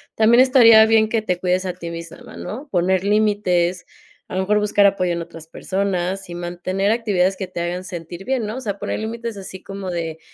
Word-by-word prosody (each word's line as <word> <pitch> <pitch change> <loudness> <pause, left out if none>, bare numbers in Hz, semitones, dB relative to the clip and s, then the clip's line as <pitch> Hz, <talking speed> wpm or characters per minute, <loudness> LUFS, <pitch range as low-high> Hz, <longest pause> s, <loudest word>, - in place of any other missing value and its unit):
también 230 +3 +5
estaría 230 -4 +7
bien 220 -1 +4
que 225 -1 0
te 180 -4 -2
cuides 185 +1 0
a 180 - -2
ti 170 -2 -8
misma, 170 0 -9
¿no? 260 +8 -7
Poner 185 0 +1
límites, 200 -4 +1 0.4
a - - -7
lo 190 - +1
mejor 210 +2 +2
buscar 205 -1 +3
apoyo 185 -3 +2
en 170 - -3
otras 165 -1 -10
personas 190 0 -2
y 175 - -6
mantener 185 +3 -2
actividades 195 -5 +1
que 190 - -4
te 175 -1 -5
hagan 175 +2 -3
sentir 175 0 -8
bien, 255 -4 -1
¿no? 220 +4 -5
O - - -5
sea, 205 -4 -3
poner - - -3
límites 230 0 -5
así 190 -1 -9
como 195 -1 -6
de 165 -2 -4
190 Hz, 210 wpm, -21 LUFS, 180-215 Hz, 0.4 s, estaría